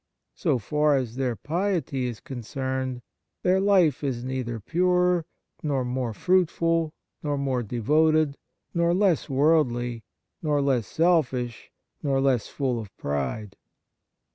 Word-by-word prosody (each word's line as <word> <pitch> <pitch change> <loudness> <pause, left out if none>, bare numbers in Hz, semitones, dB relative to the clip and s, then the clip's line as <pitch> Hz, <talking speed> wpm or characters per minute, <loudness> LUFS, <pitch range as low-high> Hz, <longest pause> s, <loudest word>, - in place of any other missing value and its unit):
So 155 -8 +1
far 150 +6 +2
as 125 -4 -2
their 130 -3 -1
piety 160 - -1
is 120 -3 -5
concerned, 130 0 -4 0.4
their 185 +1 +3
life 185 -8 +3
is 125 -4 -2
neither 125 -3 -3
purer, 180 - +2 0.3
nor 140 -5 0
more 125 -1 -2
fruitful, 165 - +1 0.3
nor 145 -2 -1
more 135 -3 0
devoted, 150 +6 +2 0.4
nor 170 0 +2
less 190 -5 +2
worldly, 125 -5 +2 0.4
nor 150 -2 +1
less 130 -7 +1
selfish, 130 - +1 0.3
nor 140 -3 +1
less 135 -4 +2
full 130 -4 -1
of 110 -3 -7
pride. 75 +9 -3
135 Hz, 120 wpm, -26 LUFS, 120-160 Hz, 0.4 s, their